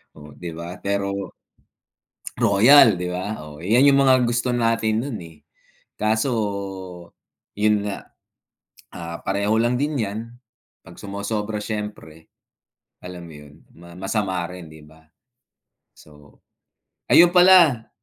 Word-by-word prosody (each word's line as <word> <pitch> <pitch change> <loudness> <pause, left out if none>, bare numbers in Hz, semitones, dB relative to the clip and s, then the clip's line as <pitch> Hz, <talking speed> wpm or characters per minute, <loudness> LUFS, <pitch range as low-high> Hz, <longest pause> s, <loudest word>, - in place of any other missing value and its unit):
oh, 75 -1 -13
'di 85 -1 -8
ba? 85 +2 -8
Pero 100 -1 -3 1.0
Royal, 115 +1 +6
'di 90 - -3
ba, 95 +4 -5
oh, 75 0 -12
'yan 120 +8 +4
'yung 140 0 +5
mga 130 -1 +5
gusto 120 +1 -1
natin 115 -2 0
noon, 135 -6 -5
eh. 80 -2 -14 0.6
Kaso 110 +5 0 1.3
'yun 105 0 +1
nga, 100 - -7 0.8
ah, 85 -1 -7
pareho 100 +2 0
lang 120 +2 +1
din 150 0 -1
'yan 110 -2 -3 0.7
'pag - - -15
sumosobra 105 +2 -4
siyempre. 105 -7 -7 0.7
Alam 90 -1 -9
mo 80 - -13
'yun, 75 -1 -14 0.5
masama 95 -2 -2
rin, 90 -4 -11
'di 80 - -14
ba? 80 +1 -20 0.9
So, 75 -1 -19 0.7
ayun 175 +1 +6
pala 175 -10 +5
105 Hz, 120 wpm, -22 LUFS, 90-115 Hz, 1.3 s, Royal